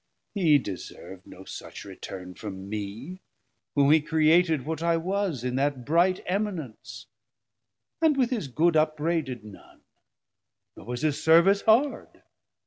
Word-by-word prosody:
he 165 -8 +4
deservd 95 -4 -8
no 95 - -12
such - - -9
return 90 -1 -9
From 95 -1 -8
me, 110 - -6 0.5
whom 140 0 +4
he 155 0 +5
created 160 -1 +3
what 160 0 -4
I 170 0 +2
was 180 - -2
In 125 0 -2
that 135 -3 -1
bright 175 +4 +2
eminence, 180 - -4 1.0
and 315 -3 +3
with 255 -2 +1
his 220 - -2
good 160 +6 +1
Upbraided 155 -5 0
none; 105 -2 -15 0.9
nor - - -13
was 125 +2 -4
his 150 -1 0
service 170 +5 +5
hard. 245 +6 +1
155 Hz, 135 wpm, -26 LUFS, 125-180 Hz, 1.0 s, he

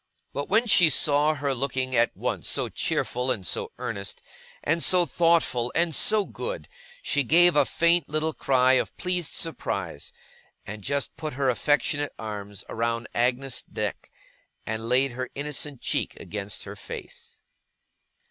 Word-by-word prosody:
But 145 - -4
when 220 +4 +4
she 180 -7 +6
saw 150 +2 +3
her 140 -1 -1
looking 130 0 -2
at 120 0 +3
once - - -2
so - - 0
cheerful 125 +1 -1
and 100 -7 -1
so - - -1
earnest, 115 -6 -4 0.4
and 160 +3 +1
so 180 -1 +5
thoughtful, 165 -9 +2
and 165 -1 +2
so 210 +6 +3
good, - - -5 0.4
she 145 - +1
gave 175 +6 +5
a 150 - +5
faint 170 0 +2
little 155 +1 -1
cry 130 -2 +3
of - - -9
pleased 180 -2 -1
surprise, 160 - -3 0.5
and 105 +1 -7
just 140 +3 -1
put 155 -1 -4
her 135 0 +2
affectionate 145 +2 +1
arms 105 -2 -6
round 115 0 -2
Agnes's 125 +2 0
neck, - - -3 0.6
and 110 +1 -3
laid 130 +2 +3
her 130 +1 -5
innocent 145 -1 -3
cheek - - -2
against 100 +1 -5
her - - -8
face. - - -10
140 Hz, 150 wpm, -26 LUFS, 120-160 Hz, 0.6 s, she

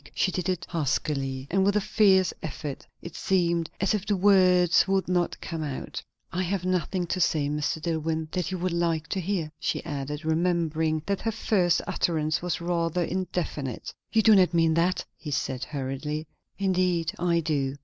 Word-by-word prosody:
She 190 - +2
did 185 -1 -2
it 180 -2 -1
huskily, 135 -4 -1
and 190 +1 +3
with 200 +1 +2
a - - +4
fierce 195 -3 +3
effort. 145 -2 -6 0.2
It 170 - -8
seemed 170 -3 +1
as 195 - +2
if 210 -3 -1
the 205 0 0
words 185 -3 +5
would 195 0 +1
not 175 -1 0
come 165 -2 -4
out. 145 -4 -5 0.3
"I 180 - -1
have 185 0 -1
nothing 185 0 0
to 185 +2 -2
say, 150 -3 +2
Mr. 150 +1 -1
Dillwyn, 160 -1 -2
that 180 -1 -2
you 190 - -3
would 180 0 -1
like 165 -2 0
to 195 - -1
hear," 175 -4 -2
she - - -2
added, 145 +2 -4
remembering 160 -1 +1
that 200 -1 -1
her 225 - 0
first 185 -5 +1
utterance 155 -2 0
was 175 -2 -2
rather 170 0 0
indefinite. 170 -8 -3 0.2
"You 220 - +3
do 220 - +7
not 185 -3 +4
mean 165 -1 +4
that?" 175 +3 +1
he 150 - -7
said 130 -2 -2
hurriedly. 150 +2 -4 0.3
"Indeed 180 -3 +1
I 170 -1 +2
do." 140 -4 -1
170 Hz, 180 wpm, -27 LUFS, 155-185 Hz, 0.3 s, do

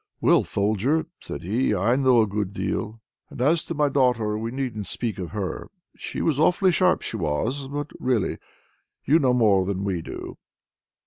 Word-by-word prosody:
"Well, - - +4
Soldier!" 110 +10 0
said - - -7
he, 105 +5 +1
"I 105 +6 +2
know 130 -4 +4
a - - -1
good 100 -1 -3
deal! 110 +1 -3 0.3
and - - -11
as 155 +6 +2
to 165 - -4
my 150 0 +2
daughter, 125 -6 +1
we 110 +2 -3
needn't 120 -5 -4
speak 115 -5 -4
of 90 -3 -4
her. 100 -3 -4 0.3
She - - -5
was 150 -4 +1
awfully 180 +4 +4
sharp, 180 +1 +2
she - - -4
was! 110 - -2
But, 145 +1 -5
really, 125 -6 0 0.7
you 155 +5 +5
know 130 -4 +3
more 105 -6 +4
than 95 0 -2
we 95 -4 -1
do!" - - -8
115 Hz, 180 wpm, -24 LUFS, 100-140 Hz, 0.7 s, you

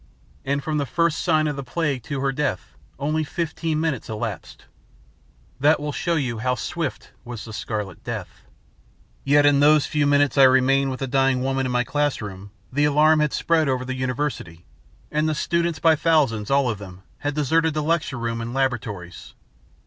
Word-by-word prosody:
And 140 +1 -1
from 150 +1 -1
the 140 - -2
first 170 +3 +1
sign 155 -3 +2
of 150 -2 -1
the 140 - -5
plague 140 0 -2
to 140 -4 -3
her 135 0 +1
death 135 -8 -3 0.2
only 155 +3 -1
fifteen 160 0 -2
minutes 155 -7 -2
elapsed. 110 -1 -6 0.9
That 150 +4 +4
will 150 0 -3
show 170 +3 -1
you 125 -7 -2
how 125 +2 0
swift 160 +5 -4
was 120 -3 -7
the 110 - -9
Scarlet 105 -4 -5
Death. - - -6 0.8
"Yet 145 +1 +4
in 145 -1 +5
those 150 0 +5
few 150 -2 0
minutes 145 0 +3
I - - +9
remained 135 +1 +4
with 130 0 -5
the 135 - -1
dying 135 -1 +2
woman 135 0 0
in - - -3
my 125 0 +2
classroom, 105 -9 -2 0.2
the 145 +2 +2
alarm 155 +2 +4
had 150 -1 +1
spread 160 -3 +1
over 130 -1 -1
the 130 - -3
university; 130 - -3 0.5
and 155 +1 +1
the 155 - -1
students, 170 +1 0
by 160 +1 +4
thousands, 145 -10 +1
all 140 -1 +3
of 110 -4 -2
them, 95 -2 -11 0.2
had 145 0 -3
deserted 160 +2 +1
the 155 - 0
lecture 155 -4 0
room 115 0 -3
and 120 +2 -5
laboratories. 105 -10 -3
140 Hz, 185 wpm, -23 LUFS, 125-155 Hz, 0.9 s, I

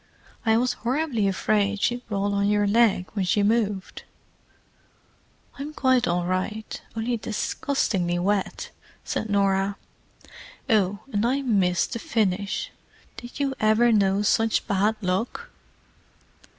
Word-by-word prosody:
"I 220 0 +5
was 245 +1 +1
horribly 250 -4 0
afraid 205 +1 +1
she'd 245 +4 0
roll 200 -1 -1
on 200 0 +1
your 205 0 +2
leg 210 -3 +3
when 200 -3 -1
she 195 +3 +2
moved." 205 -3 0 1.6
"I'm 295 +2 -5
quite 260 -2 +2
all 175 0 0
right—only 220 +5 -3
disgustingly 210 -5 -1
wet," 195 +2 -1 0.3
said 220 - -3
Norah. 195 0 +1 0.9
"Oh, 205 -2 +2
and 205 +1 +1
I 265 +4 +1
missed 195 -4 +1
the 230 - -3
finish—did 210 +4 -4
you 275 -1 0
ever 220 +2 +4
know 200 -2 +2
such 225 +1 +2
bad 205 +3 +1
luck?" 190 +5 -2
210 Hz, 115 wpm, -25 LUFS, 195-230 Hz, 1.6 s, I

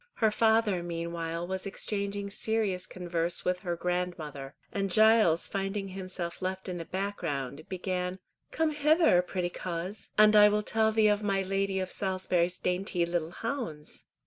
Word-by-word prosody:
Her 220 -2 +3
father 220 -4 +3
meanwhile 170 0 -3
was 190 +2 -3
exchanging 200 0 -3
serious 205 -4 -1
converse 175 -1 -2
with 180 0 +1
her 175 -3 -2
grandmother, 170 -6 -3 0.2
and 195 -1 -1
Giles 215 -4 +5
finding 195 0 -3
himself 185 -2 -5
left 185 +1 -3
in 180 -1 -4
the 165 - -5
background, 155 -8 -3
began: 180 0 -2 0.3
"Come 320 0 +1
hither, 300 - +4
pretty 180 0 -2
coz, 180 +4 -5
and 215 0 +7
I 210 0 +9
will 210 0 +1
tell 220 +1 +2
thee 220 -1 +4
of 205 0 +2
my 195 -2 +1
Lady 195 0 0
of 185 -1 -3
Salisbury's 185 -2 0
dainty 180 -1 0
little 170 -2 -1
hounds." 220 - -5
185 Hz, 150 wpm, -29 LUFS, 175-210 Hz, 0.3 s, I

